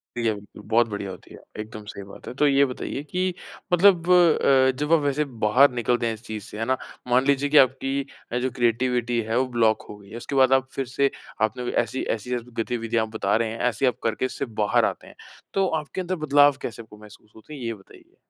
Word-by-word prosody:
ठीक 120 - -2
है। 110 - +2 0.2
बहुत 115 +2 +2
बढ़िया 100 -2 -5
होती - - -12
है। - - -12 0.2
एकदम 110 0 -9
सही 100 -1 -8
बात 100 - -13
है। - - -5
तो 145 +3 +2
ये 140 0 +4
बताइए 135 +2 -5
कि 180 +4 -2 0.4
मतलब 175 -1 +5
अ, 140 -7 +5
जब 150 +3 0
आप 165 - +6
वैसे 145 +1 +1 0.2
बाहर 130 +6 +5
निकलते 120 0 0
हैं 115 - -1
इस 110 +2 -11
चीज़ 110 -2 -6
से, 105 - -9
है 115 - -1
ना? 130 +1 +1 0.3
मान 125 +2 +3
लीजिए 140 0 +2
कि 150 - +4
आपकी 135 -1 +1
जो 130 - 0
क्रिएटिविटी 120 0 0
है 115 +2 0
वो 130 - +2
ब्लॉक 110 -1 +3
हो 105 - -9
गई 100 0 -17
है। 115 - -8
उसके 135 +3 -6
बाद 130 0 +5
आप 130 0 +2
फिर 135 - -2
से 135 +2 +1 0.3
आपने 120 +3 0
ऐसी 130 - -5 0.2
ऐसी 125 +4 -4 0.3
गतिविधियाँ 115 -1 -1
आप 110 - -13
बता 100 -1 +1
रहे 115 -1 +1
हैं, 115 - -7
ऐसी 125 +1 0
आप 125 - +1
करके 115 +2 0
इससे 135 +1 -3 0.2
बाहर 105 - +3
आते - - -4
हैं। - - -15 0.4
तो 195 -1 +2
आपके 170 +5 -6
अंदर 185 +1 -2
बदलाव 145 -1 +5
कैसे 115 0 -5
आपको 105 -1 -15
महसूस 105 0 -16
होते 110 +7 -13
हैं 140 - -8
ये 115 -1 -3
बताइए? 95 -2 -18
125 Hz, 230 wpm, -24 LUFS, 110-140 Hz, 0.4 s, आप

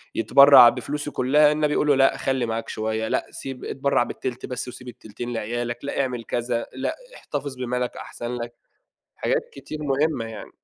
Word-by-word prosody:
يتبرَّع 135 +1 +8
بفلوسه 150 +3 -4
كلها، 145 +4 +4
النبي 150 -1 +1
يقول 150 - +1
له 145 - +5
لأ، 135 0 +4
خلِّي 130 -2 0
معاك 115 0 -3
شوية، 110 0 -2
لأ - - 0
سيب 135 -1 -7
اتبرَّع 135 -3 +1
ب - - -6
التلت 125 -1 -5
بس 125 0 -5
وسيب 125 0 -10
التلتين 120 +1 -7
لعيالك، 120 +3 -3
لأ 140 - -1
اعمَل 125 -3 -3
كذا، 120 -1 -2
لأ 130 +1 -3 0.2
احتفِظ 140 -2 -5
بمالك، 125 0 -2
أحسَن 120 +1 -6
لك، 120 0 -6 0.6
حاجات - - 0
كتير 155 - -8
مهمَّة 140 -3 0
يعني. 110 - -9
125 Hz, 175 wpm, -24 LUFS, 120-140 Hz, 0.6 s, يتبرَّع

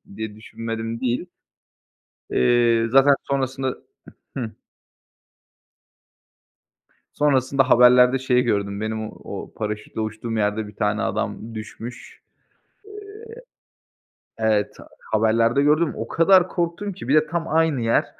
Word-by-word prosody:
Diye 110 0 -6
düşünmedim 115 +1 -6
değil. 125 +7 -2 1.0
Eee, 115 - +3
zaten 135 +2 +6
sonrasında 130 -1 -2 0.6
hı. 115 -4 -5 2.6
Sonrasında 135 -2 +2
haberlerde 125 +1 +6
şeyí 130 -1 +2
gördüm, 100 -3 -1
benim 110 0 -3
o - - -7
paraşütle 105 0 -5
uçtuğum 110 +1 -4
yerde 105 +1 0
bir 105 - -15
tane 105 +1 0
adam 110 +1 -3
düşmüş. 115 +3 -9 2.2
Eee 110 - -1
evet, 105 -1 +1 0.4
haberlerde 115 +4 +2
gördüm 150 +3 +2
o 115 - -5
kadar 185 +4 +4
korktum 175 +3 -3
ki 180 - -10
bir 140 - +3
de 155 - +3
tam 165 -1 -3
aynı 160 -4 +1
yer. 115 0 +2
115 Hz, 110 wpm, -22 LUFS, 110-135 Hz, 2.6 s, zaten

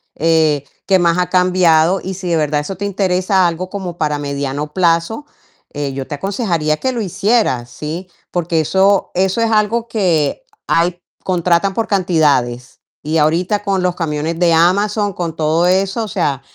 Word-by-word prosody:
Eh, 160 -3 +2 0.2
qué 190 -1 +3
más 170 -1 +2
ha 180 0 0
cambiado, 180 -1 +3
y 190 - -4
si 180 -1 -5
de 170 - +2
verdad 150 -1 0
eso 150 +6 -5
te 200 - -3
interesa, 185 -1 +1
algo 175 +2 -4
como 185 -3 -6
para 150 -2 -1
mediano 140 +1 -4
plazo, 175 - +1 0.5
eh, 145 -2 -3
yo 135 0 -4
te 150 - -4
aconsejaría 170 - -1
que 260 - -1
lo 240 - -3
hicieras, 200 - 0
¿sí? 160 +8 -6 0.2
Porque 170 -2 0
eso 190 +5 +2
eso 190 +4 +1
es 230 - +2
algo 225 +2 +1
que 185 - 0 0.2
hay 175 +1 +1 0.2
contratan 180 +1 +1
por 225 +2 -1
cantidades. 150 - 0 0.2
Y 155 +2 -1
ahorita, 175 +7 +1
con 195 -2 0
los 180 -1 0
camiones 160 0 -3
de 175 -2 +3
Amazon, 200 +5 +2
con 170 -2 -4
todo 160 +2 +1
eso, 195 +4 +1
o - - -4
sea, 150 -10 -1
175 Hz, 170 wpm, -17 LUFS, 155-195 Hz, 0.5 s, qué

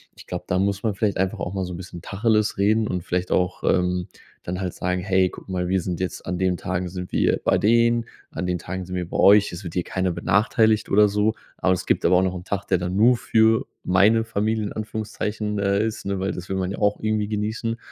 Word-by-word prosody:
ich - - -15
glaube, - - -5
da 90 0 +1
muss 100 +1 0
man 110 - +1
vielleicht 100 +1 -1
einfach 95 0 -1
auch 90 - -4
mal 95 -1 -1
so 90 - -6
'n - - -6
bisschen 90 -1 -9
Tacheles 105 0 +1
reden 110 +2 +3
und 90 -2 -3
vielleicht 90 +1 -2
auch, 90 -1 0
ähm, 90 -1 +1 0.4
dann 90 +1 -4
halt 90 -2 -3
sagen, 90 0 -1
„Hey, 95 -1 +2
guck - - -12
mal, 90 -1 -2
wir 95 -1 +1
sind 90 0 -4
jetzt 95 - -4
an 90 -1 -2
den 95 -1 +1
Tagen 90 0 -3
sind 90 0 -7
wir - - +2
bei - - +3
denen, 115 +2 +3 0.2
an 90 - -4
den 90 -1 -1
Tagen 95 0 -5
sind 90 - -8
wir 90 -1 -3
bei - - -3
euch, 100 +1 +6
es 85 +3 -7
wird 85 -3 -7
hier 90 - 0
keiner 95 -1 -1
benachteiligt 110 +4 +2
oder 105 +1 +5
so." 105 +2 +1 0.2
Aber 95 - +2
es 90 - -3
gibt - - +1
aber 90 - +5
auch 90 - +4
noch 95 -1 0
'nen 90 - -6
Tag, 100 +1 -3
der 95 - +2
dann 90 +1 -3
nur 120 +4 +5
für 110 -1 +3 0.2
meine 105 +5 +4
Familie, 110 0 -1
in - - -5
Anführungszeichen, 105 -1 -3
äh, 100 +1 +1
ist, 110 - -4
ne 100 -1 -2
weil 95 +1 -1
das 90 +1 -7
will 95 - -1
man 95 -1 -1
ja - - -5
auch 105 0 +1
irgendwie 110 -1 0
genießen 110 +2 -2
95 Hz, 250 wpm, -23 LUFS, 90-105 Hz, 0.4 s, euch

